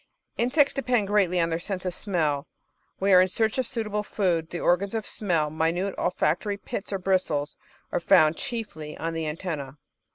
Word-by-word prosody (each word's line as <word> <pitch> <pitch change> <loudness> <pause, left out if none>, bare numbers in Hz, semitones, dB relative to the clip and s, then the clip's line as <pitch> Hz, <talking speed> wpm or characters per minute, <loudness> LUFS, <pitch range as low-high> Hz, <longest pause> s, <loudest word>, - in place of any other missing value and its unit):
Insects 275 +4 +3
depend 245 -5 +1
greatly 190 -4 +3
on 165 0 +1
their 165 - 0
sense 185 +1 -4
of 180 - -1
smell 160 -7 -1 0.5
whei 190 -1 +6
in 185 - +4
search 220 +5 0
of 255 - 0
suitable 210 -3 -2
food, 180 -6 0
and - - -31
the 175 - -4
organs 195 +6 +1
of 220 -2 -2
smell, 165 -7 0
minute 165 +5 0
olfac 175 -2 +1
tory 205 -1 -3
pits 200 0 -6
or 195 - 0
bristles, 180 -6 0 0.4
are - - +1
found 165 -3 +5
chiefly 160 - -5
on 165 +1 -3
the 165 -1 -2
antennae. 150 -4 -4
185 Hz, 185 wpm, -26 LUFS, 165-210 Hz, 0.5 s, whei